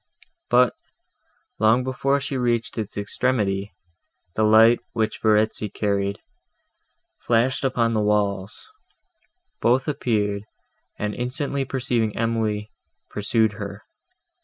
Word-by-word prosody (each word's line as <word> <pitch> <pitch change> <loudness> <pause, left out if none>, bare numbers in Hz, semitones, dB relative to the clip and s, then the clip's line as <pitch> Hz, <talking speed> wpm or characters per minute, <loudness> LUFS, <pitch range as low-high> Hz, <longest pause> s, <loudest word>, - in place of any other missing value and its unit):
But, 125 0 +4 0.9
long 110 +3 +4
before 135 +2 0
she 140 0 -4
reached 120 -2 0
its 105 -2 -5
extremity, 105 -2 0 0.6
the - - 0
light, 110 +2 +6
which 110 -2 -1
Verezzi 110 -1 +2
carried, 100 -1 -1 1.0
flashed 120 +3 +1
upon 120 -3 +1
the 110 - +1
walls; 105 -2 -1 0.9
both 125 +3 +2
appeared, 105 -8 0 0.6
and, 105 0 -2
instantly 135 +3 -2
perceiving 120 -5 -1
Emily, 110 -2 -1 0.4
pursued 110 +1 +1
her. 100 -1 -7
110 Hz, 100 wpm, -23 LUFS, 105-125 Hz, 1.0 s, light